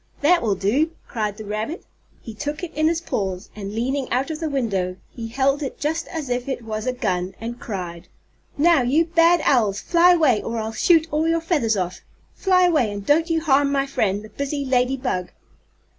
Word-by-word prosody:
"That 340 +4 +4
will 210 -4 +1
do!" 265 - +1
cried 210 -3 -3
the 215 - -8
rabbit. 215 - -4 0.4
He 225 - -8
took 295 - -5
it 335 -2 -5
in 310 +1 +2
his 330 0 0
paws 190 - -3
and, 200 -2 -6
leaning 260 +3 -1
out 265 +5 0
of 310 - -5
the 320 -2 -2
window, 195 -10 -1 0.2
he 230 -2 -6
held 275 +5 +1
it 275 - -5
just 320 +3 -2
as 315 -4 -5
if 245 +1 -2
it 260 -3 -3
was 215 +1 -4
a - - +2
gun, 185 -6 -2
and 235 +2 -6
cried: 175 -5 -6 0.5
"Now, 325 0 +5
you 280 +7 +2
bad 335 0 +4
owls, 215 -7 +3
fly 350 +1 +5
away 290 -11 +3
or 230 0 -4
I'll 220 0 -3
shoot 325 +7 +4
all 305 +2 +1
your 330 0 +2
feathers 295 - +1
off! 180 -1 -3 0.3
Fly 370 -2 +3
away 305 -12 +3
and 200 -1 -6
don't 320 - +3
you 325 -1 +1
harm 285 -2 +3
my 275 -1 +1
friend, 210 -7 -1
the 215 - -11
busy 280 +4 -3
lady 255 0 +1
bug!" 185 -9 -2
265 Hz, 205 wpm, -22 LUFS, 215-315 Hz, 0.5 s, Now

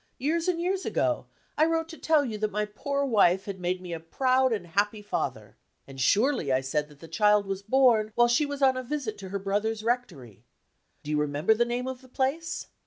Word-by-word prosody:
Years 325 +6 -1
and 355 -2 +1
years 370 +2 -1
ago, - - -1 0.3
I 310 - +5
wrote 325 0 0
to 325 - -9
tell 310 -3 +3
you 220 -4 -4
that 215 0 0
my 210 +1 -1
poor 280 +7 -2
wife 195 -7 +3
had 195 -2 -6
made 180 +1 -2
me 175 -1 -6
a 165 - -4
proud 255 +10 +1
and 205 -6 -2
happy 205 +4 -1
father. 205 - -4 0.3
And 135 -1 -8
surely 210 - +2
I 130 - +3
said 145 +3 -2
that 145 -2 -18
the 165 - -10
child 210 +5 +3
was 195 0 -4
born 220 -1 +3
while 240 0 +5
she 245 +5 +2
was 285 -1 -4
on 260 -1 +5
a 255 - -2
visit 255 -4 -4
to 190 -2 -8
her 200 - -2
brother's 210 +3 -2
rectory. 160 - -3 0.6
Do 150 - -5
you 150 - +1
remember 150 +7 +2
the 235 +2 +1
name 245 +2 -3
of 260 -1 -5
the 260 - -16
place? 275 +6 -2
215 Hz, 225 wpm, -27 LUFS, 185-265 Hz, 0.6 s, I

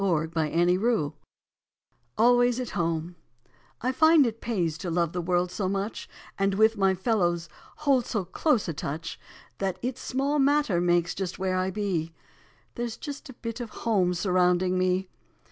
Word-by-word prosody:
April 160 -4 +1
Eleventh 175 +3 +1 1.0
ALWAYS 245 +1 +4
AT 250 - -3
HOME 165 0 -2 0.7
T 255 - +2
FIND 315 +2 +5
it 225 -1 -3
pays 175 -9 -1
to 185 - -4
love 170 -1 0
the 175 - -2
world 175 +1 0
so 190 -1 -2
much, 200 +2 -3 0.3
And 195 0 +2
with 220 +2 +4
my 195 -2 +2
fellows 175 -5 0 0.3
hold 275 -5 +1
so 205 -5 -2
close 235 - +1
a 165 - -2
touch, 160 +3 -5 0.4
That 190 -2 -1
it 255 +1 -3
small 275 +3 -1
matter 280 -10 +3
makes 175 -1 +2
just 190 -1 -4
where 185 -1 -1
I 185 0 0
be, 180 -5 -2 0.6
There 240 - -3
s 225 - -7
just 290 0 -7
a - - -8
bit 230 0 -6
of 240 -2 -5
HOME 195 -6 0
surrounding 180 0 +2
me. 185 +1 +1
190 Hz, 160 wpm, -27 LUFS, 175-235 Hz, 1.0 s, FIND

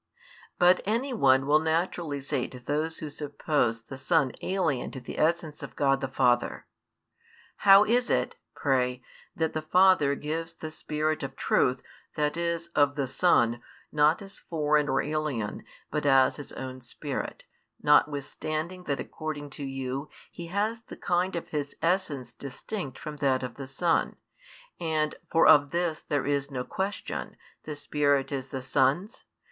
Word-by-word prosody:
But 180 0 +5
any 235 +6 -1
one 135 - +4
will 150 +2 +5
naturally 160 -2 -1
say 135 -2 -1
to 125 - -10
those 155 +5 -2
who 155 - -5
suppose 145 -5 -1
the 135 - -9
Son 155 -4 +2
alien 170 -9 0
to 130 - -7
the 125 - -7
essence 160 -1 0
of 135 -4 -8
God 135 -1 +2
the 135 - -1
Father: 125 -2 +1 0.9
"How 195 0 +8
is 245 +3 +2
it, 125 0 +1 0.2
pray, 125 -2 0 0.3
that 160 -1 0
the 155 - -2
Father 180 -3 +4
gives 165 +3 -4
the 155 -1 -7
Spirit 155 0 -2
of 135 -1 -5
Truth, 125 -1 +1 0.3
that 150 0 0
is, 170 0 -2
of 145 -3 +2
the 140 -2 -1
Son, 120 -6 +3 0.3
not 150 +5 +3
as 195 0 -9
foreign 150 -2 +1
or 135 - +2
alien, 145 -8 -2 0.3
but 150 -1 -1
as 135 -1 +5
His 145 - -8
own 130 0 -6
Spirit; 120 - -5 0.3
notwithstanding 155 +4 +1
that 140 - -1
according 145 -2 -5
to 140 - -6
you 135 +1 -4 0.2
He 170 - -8
has 210 +5 -1
the - - -11
kind 180 +1 0
of 170 - -4
His 145 -2 -3
essence 155 -9 -1
distinct 140 - -6
from 150 -2 -7
that 135 -2 +1
of 125 -2 -4
the 135 +2 -8
Son, 165 +4 +1 0.6
and, 155 -2 0 0.2
for 165 - +5
of 145 -1 +7
this 170 -1 -1
there 145 -2 -1
is 140 -1 0
no 130 -3 -3
question, 195 +8 -4 0.3
the 150 - -5
Spirit 145 -1 +1
is 135 -2 -3
the 130 -1 -5
Son's? 140 - +1
150 Hz, 160 wpm, -28 LUFS, 135-165 Hz, 0.9 s, How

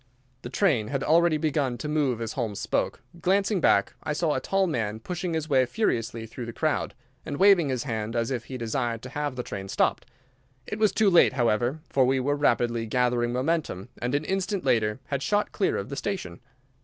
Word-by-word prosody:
The - - -7
train 140 - +2
had 135 +2 -2
already 165 0 +4
begun 145 -5 0
to 150 - -5
move 145 -6 0
as 115 - -3
Holmes 110 -6 -3
spoke. - - -1 0.2
Glancing 195 +1 +2
back, 100 - +3
I 150 - -2
saw 155 0 +1
a - - 0
tall 195 +8 +1
man 110 - -2
pushing 175 +5 -3
his 160 -1 -2
way 135 -4 +4
furiously 115 - -1
through 115 +2 -7
the 115 - -6
crowd, 155 -2 -1 0.3
and 145 -3 -5
waving 190 -5 +5
his 130 -2 -1
hand 110 -3 -3
as 115 +2 0
if 120 -3 -3
he 130 - -6
desired 115 -1 -2
to 130 - -7
have 145 -1 -3
the 125 - -3
train 95 -3 -6
stopped. - - 0 0.6
It 210 - -5
was 215 -2 +4
too 215 -3 +3
late, 170 -6 +6
however, 120 +3 +1
for 135 - +2
we 130 +1 +2
were 145 +3 +1
rapidly 120 -5 +1
gathering 120 0 +1
momentum, 130 - -1
and 125 +3 0
an 145 +2 -1
instant 195 0 -1
later 110 -3 +2
had 140 -2 -1
shot 205 +9 0
clear 195 - 0
of 100 - -4
the 140 - -4
station. 180 - -4
130 Hz, 205 wpm, -26 LUFS, 115-160 Hz, 0.6 s, late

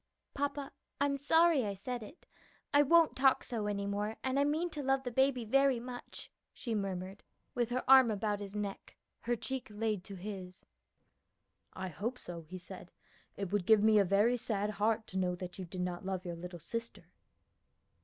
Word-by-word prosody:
"Papa, 285 0 -2 0.3
I'm 280 0 +2
sorry 320 +1 +4
I 200 -2 -2
said 245 +5 -4
it. 220 - -12 0.5
I 290 - +7
won't 330 +3 +5
talk 265 0 +4
so 220 -4 -3
any 200 -1 -2
more; 205 +2 -2
and 260 +1 +1
I - - +4
mean 315 +4 0
to 300 - -4
love 270 0 +1
the 245 - -3
baby 265 -1 +2
very 275 +2 +3
much," 245 +1 -9 0.2
she 235 - -4
murmured 195 -2 -3 0.3
with 240 -2 0
her 250 +1 -1
arm 260 -2 +8
about 210 -1 -1
his 200 0 -7
neck, 205 -1 -5 0.2
her 240 +1 -1
cheek 260 +3 -4
laid 210 -2 -2
to 200 - -8
his. 185 -1 -7 1.1
"I 190 0 -4
hope 220 +10 -3
so," 175 -7 -8
he 165 +4 -9
said; 180 0 -10 0.5
"it 195 -2 -4
would 205 -3 0
give 220 -2 +6
me 215 -1 +6
a - - +6
very 205 +6 +3
sad 210 -2 -1
heart 215 +1 +1
to 190 - -3
know 180 -1 0
that 180 +1 -8
you 185 - -4
did 180 +1 -6
not 180 0 -3
love 190 -1 -3
your 175 -1 -4
little 175 +1 -7
sister. 230 +8 -6
215 Hz, 190 wpm, -33 LUFS, 195-260 Hz, 1.1 s, arm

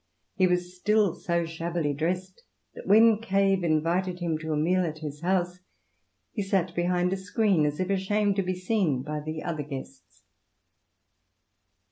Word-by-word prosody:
He 185 -3 +3
was 180 0 -1
still 210 -1 +2
so 170 -1 -1
shabbily 165 -2 -2
dressed 180 +5 -3 0.3
that - - -10
when 220 +2 +6
Cave 195 -3 +2
invited 170 +3 +1
him 170 -2 -1
to 160 0 -4
a 150 - 0
meal 180 +4 +2
at 160 -2 -3
his 150 -1 -7
house 180 0 0 0.7
he 210 - -2
sat 190 -3 0
behind 180 +1 +1
a - - -1
screen, 190 -4 +1
as 145 0 -3
if 185 +1 -1
ashamed 200 +1 +1
to - - +3
be 185 0 -2
seen 180 - 0
by 150 +1 -4
the 155 +1 -5
other 160 -3 -3
guests. 135 - -9
180 Hz, 160 wpm, -27 LUFS, 160-190 Hz, 0.7 s, when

